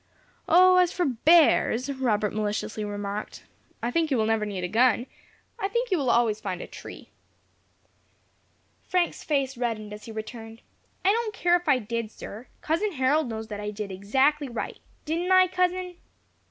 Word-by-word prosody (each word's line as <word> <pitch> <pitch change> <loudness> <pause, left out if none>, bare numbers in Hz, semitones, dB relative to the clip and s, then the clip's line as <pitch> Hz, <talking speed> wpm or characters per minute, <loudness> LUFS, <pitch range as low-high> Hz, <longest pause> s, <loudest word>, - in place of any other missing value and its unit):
"O, 365 +2 +7
as 360 -1 +4
for 360 - -1
bears," 275 -2 +4
Robert 215 -6 0
maliciously 215 0 -2
remarked, 205 0 -5 0.4
"I 240 - 0
think 325 +2 +1
you 270 - +1
will 220 - +2
never 220 -1 0
need 195 -3 -4
a - - 0
gun. 240 +3 +3 0.5
I 390 - 0
think 475 +3 -2
you 365 - +2
will 265 -3 0
always 230 -3 +2
find 185 -3 -4
a - - -6
tree." - - -11 1.8
Frank's 360 -2 0
face 275 -3 0
reddened 220 -4 -3
as 210 - -10
he 225 - -8
returned, 225 +1 -8 0.4
"I 390 - +6
don't 440 -1 -1
care 350 0 +3
if 350 -3 -1
I 265 - +5
did, 230 -1 -4
sir. 220 +2 -10
Cousin 360 +6 0
Harold 265 +1 +1
knows 220 -1 -5
that 205 -1 -5
I 210 0 -4
did 210 -1 -6
exactly 265 +9 +1
right. 240 - -5 0.3
Didn't 335 +4 -1
I, 370 0 +7
cousin?" 365 0 -1
250 Hz, 170 wpm, -26 LUFS, 215-345 Hz, 1.8 s, O